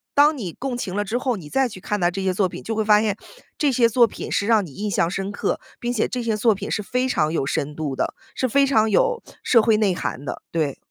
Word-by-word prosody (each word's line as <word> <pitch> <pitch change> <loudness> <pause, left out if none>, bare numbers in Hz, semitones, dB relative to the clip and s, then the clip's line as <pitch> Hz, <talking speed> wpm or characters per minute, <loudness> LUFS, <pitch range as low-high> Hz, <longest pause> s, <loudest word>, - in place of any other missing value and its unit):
当 295 +1 +5
你 185 -8 -5
共 260 -2 -4
情 190 -6 -4
了 205 - +1
之 215 +4 -2
后， 255 -1 0
你 160 -7 -9
再 270 -1 +2
去 195 -5 -10
看 210 +2 -2
待 175 - +3
这 190 +2 -4
些 190 -1 +1
作 190 +1 +2
品， - - -9
就 225 - -3
会 220 -1 -1
发 210 0 +5
现 210 -2 0 0.4
这 295 - +2
些 240 -3 +3
作 235 +1 +5
品 - - -7
是 200 - 0
让 220 -4 +4
你 150 - -12
印 210 +8 -3
象 170 -3 +1
深 195 0 -3
刻， 200 - -2 0.2
并 240 - -3
且 235 -3 +1
这 250 -1 -3
些 225 -2 0
作 220 0 +3
品 - - -6
是 210 - 0
非 250 +5 -1
常 155 -8 +1
有 150 - 0
深 145 +1 -2
度 150 -3 -3
的， - - -2 0.2
是 260 - 0
非 280 +3 +3
常 220 -5 +3
有 485 - +2 0.2
社 235 -3 +5
会 220 0 +3
内 210 -3 +2
涵 140 -5 -4
的， 145 - -5
对。 155 -5 0
215 Hz, 295 characters per minute, -22 LUFS, 185-245 Hz, 0.4 s, 当